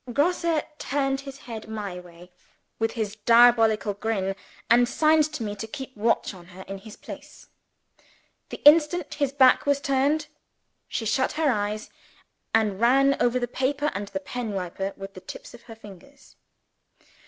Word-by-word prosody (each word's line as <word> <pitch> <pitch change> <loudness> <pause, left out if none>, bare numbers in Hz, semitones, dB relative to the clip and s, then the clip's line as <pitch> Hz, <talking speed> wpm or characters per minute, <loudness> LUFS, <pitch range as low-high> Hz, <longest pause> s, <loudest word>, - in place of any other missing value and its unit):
Grosse 330 +3 +1 0.2
turned 270 -1 -1
his 275 -1 -9
head 225 -3 -7
my 205 -5 -5
way, 175 0 -15 0.5
with 225 0 0
his 215 -3 -3
diabolical 230 -2 +4
grin; 195 -2 -2 0.3
and 240 +1 +4
signed 310 +1 +3
to 265 - -4
me 205 -1 -4
to 220 +2 -6
keep 265 +2 -8
watch 220 0 0
on 175 -2 -14
her, 185 +1 -11
in 195 +1 -8
his 215 +1 -12
place. - - -12 1.0
The - - -9
instant 305 +2 +5
his 285 -3 -1
back 270 0 +4
was 285 -1 +3
turned, 280 +3 +1 0.6
she 225 - -4
shut 260 +4 +1
her 310 -2 +2
eyes, 210 0 -3 0.6
and 215 -3 +1
ran 275 +3 +4
over 245 +1 +2
the 245 -1 -1
paper 280 +4 -1
and 200 0 -4
the 290 - -4
pen 245 -6 -5
wiper 190 +1 -3
with 195 0 -8
the 185 - -11
tips 185 - -10
of 240 - -13
her 225 - -11
fingers! 225 +6 -16
235 Hz, 165 wpm, -25 LUFS, 205-275 Hz, 1.0 s, instant